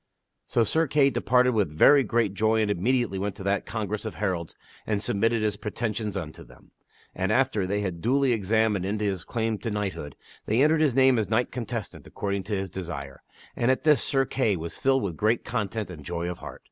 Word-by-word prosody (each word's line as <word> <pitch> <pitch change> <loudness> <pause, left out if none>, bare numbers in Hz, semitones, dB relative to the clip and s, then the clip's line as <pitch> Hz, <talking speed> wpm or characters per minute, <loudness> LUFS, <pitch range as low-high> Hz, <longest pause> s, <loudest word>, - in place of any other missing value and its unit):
So 115 - +2
Sir 160 +8 +1
Kay 140 0 +3
departed 125 0 +3
with 105 -7 +1
very 135 - +6
great 115 -3 0
joy 110 +2 +2
and 105 - 0
immediately 110 +1 0
went 100 0 -3
to 100 - -9
that 100 +1 -1
congress 110 -1 -3
of 110 - -5
heralds 90 -5 -3 0.3
and 105 -2 0
submitted 110 +3 +1
his 105 -1 0
pretensions 105 -1 -3
unto 80 -5 -7
them. - - -19 0.4
And, - - -1
after 100 -4 +1
they 100 +2 -1
had 90 -4 -4
duly 135 +4 +2
examined 110 -2 +1
into 105 +2 -2
his 95 -4 -2
claims 110 -2 -2
to 115 - -2
knighthood, 100 -9 -4 0.3
they 115 +6 +3
entered 155 +1 +3
his 145 -6 +2
name 130 -2 +5
as 105 - -1
a - - -19
knight 115 +3 +1
contestant 115 -3 -5
according 100 -1 -3
to 105 - -2
his 95 -2 -4
desire; 80 -8 -6 0.3
and 120 - +1
at 130 - +1
this 150 -2 +4
Sir 135 -1 +2
Kay 115 -6 0
was 85 -1 -6
filled 135 -1 +1
with 90 -6 -3
great 110 +3 +1
content 110 -4 -3
and 75 -5 -10
joy 85 +2 -3
of 90 - -8
heart. - - -9
105 Hz, 210 wpm, -26 LUFS, 95-120 Hz, 0.4 s, very